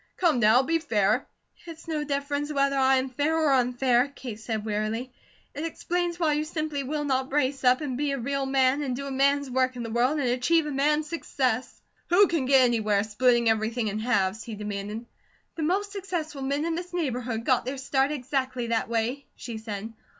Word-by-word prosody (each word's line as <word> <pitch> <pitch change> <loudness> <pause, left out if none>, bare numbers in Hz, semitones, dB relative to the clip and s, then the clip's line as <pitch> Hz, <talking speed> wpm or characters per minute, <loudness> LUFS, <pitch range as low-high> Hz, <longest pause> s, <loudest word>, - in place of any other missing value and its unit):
Come 330 -8 +3
now, 235 +3 +5
be 330 +4 +1
fair!" 210 -10 +1 0.4
"It's 330 0 -10
no 310 -2 -1
difference 285 +1 -2
whether 275 -1 +1
I 265 0 +4
am 260 0 0
fair 295 +5 0
or 310 -3 +3
unfair," 250 0 +3
Kate 250 -6 -8
said, 220 -1 -4
wearily. 220 +4 -2 0.4
"It 290 - -5
explains 345 +1 -2
why 315 -3 +2
you 300 +1 0
simply 310 -2 -3
will 295 +3 -3
not 265 -2 0
brace 275 -1 0
up, 250 +2 +4
and 265 -4 -3
be 290 -1 0
a 275 - -1
real 275 +2 -2
man, 265 +1 +2
and 260 -4 -2
do 280 +2 -5
a 275 - -5
man's 280 +1 +2
work 255 0 0
in 240 - -5
the 230 - -5
world, 250 +6 +2
and 280 -4 0
achieve 275 +7 +2
a 300 - -3
man's 300 +2 +1
success." 260 -7 -2 0.3
"Who 370 +4 +6
can 330 -8 -1
get 270 -1 +6
anywhere, 215 -5 +2
splitting 235 +2 +2
everything 220 +1 +1
in 210 +1 -3
halves?" 215 -3 0
he 225 - -7
demanded. 210 +2 -5 0.5
"The 325 - -6
most 390 +6 0
successful 350 -7 -4
men 280 +3 -1
in 335 - -1
this 355 +1 -5
neighbourhood 245 -8 -2
got 255 -2 +2
their 265 +2 -3
start 270 +1 +1
exactly 260 -3 -2
that 230 -1 0
way," 235 +4 -1
she 230 -3 -7
said. 220 0 -6
265 Hz, 200 wpm, -26 LUFS, 240-295 Hz, 0.5 s, Who